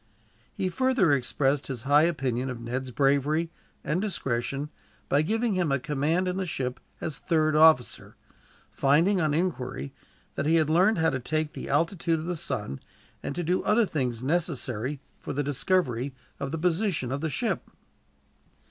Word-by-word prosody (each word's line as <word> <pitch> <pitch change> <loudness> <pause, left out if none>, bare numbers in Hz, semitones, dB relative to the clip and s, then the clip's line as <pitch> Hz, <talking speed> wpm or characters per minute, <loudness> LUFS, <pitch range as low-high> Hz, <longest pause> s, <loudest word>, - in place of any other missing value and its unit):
He 185 - -2
further 235 - +2
expressed 135 +1 +1
his 125 -4 -5
high 145 +3 +5
opinion 130 -6 -1
of 125 -2 -5
Ned's 125 +3 -4
bravery, 145 +5 +1 0.3
and 165 +5 0
discretion, 140 - -2 0.4
by 140 - +3
giving 220 +7 0
him 180 -5 +1
a 140 - +3
command 150 +7 0
in 180 +1 -1
the 190 -1 -2
ship 125 -5 -3 0.2
as 150 -4 -4
third 155 -2 +1
officer; 155 -5 +4 0.6
finding, 170 +8 +3
on 150 -2 +1
inquiry, 130 - -2 0.4
that 140 - -2
he 165 - +4
had 155 -2 +3
learned 185 +6 +4
how 160 0 +3
to 130 - -2
take 155 +4 -2
the - - -7
altitude 165 +3 +1
of 155 - -5
the 175 +1 -2
sun, 115 - -3 0.4
and 140 - -4
to 175 - -2
do 180 +3 +1
other 220 +2 +3
things 125 - -2
necessary 140 -5 -1 0.2
for - - -5
the 145 +2 -1
discovery 140 -3 0 0.2
of 140 - -3
the 165 - -3
position 170 - 0
of 140 +1 -2
the 160 - -1
ship. 230 - -2
150 Hz, 165 wpm, -27 LUFS, 135-175 Hz, 0.6 s, high